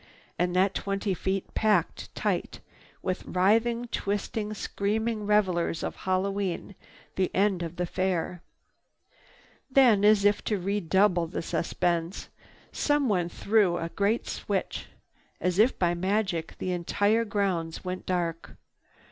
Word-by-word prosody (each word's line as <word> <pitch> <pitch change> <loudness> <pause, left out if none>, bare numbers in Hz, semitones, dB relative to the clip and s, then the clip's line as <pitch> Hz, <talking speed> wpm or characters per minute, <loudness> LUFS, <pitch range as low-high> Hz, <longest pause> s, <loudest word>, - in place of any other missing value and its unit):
And 180 0 +1
that 190 +1 +3
twenty 195 0 -1
feet 190 +1 -2
packed 210 -6 0
tight - - -2 0.4
with 185 0 -2
writhing, 225 +6 +2
twisting, 210 +1 -2
screaming 215 +2 -2
revelers 185 -6 +1
of - - -3
Hallowe'en, 190 0 -2 0.4
the 185 -1 +2
end 195 -2 +2
of 170 0 -5
the 180 0 -1
Fair! 180 -1 -1 1.3
Then, 250 -7 +5
as 210 -1 +5
if 205 0 +3
to 210 - +1
redouble 190 -1 +2
the 170 - -4
suspense, 170 +1 -1 0.4
someone 235 - +1
threw 200 -3 +2
a 165 -1 -3
great 200 +6 0
switch. - - -3 0.5
As 180 +1 0
if 235 +5 +4
by 175 -1 +2
magic, 185 -2 -1
the 185 - -3
entire 205 +6 +1
grounds 195 -6 -2
went 185 0 -5
dark. 170 -2 -2
195 Hz, 120 wpm, -28 LUFS, 175-210 Hz, 1.3 s, Then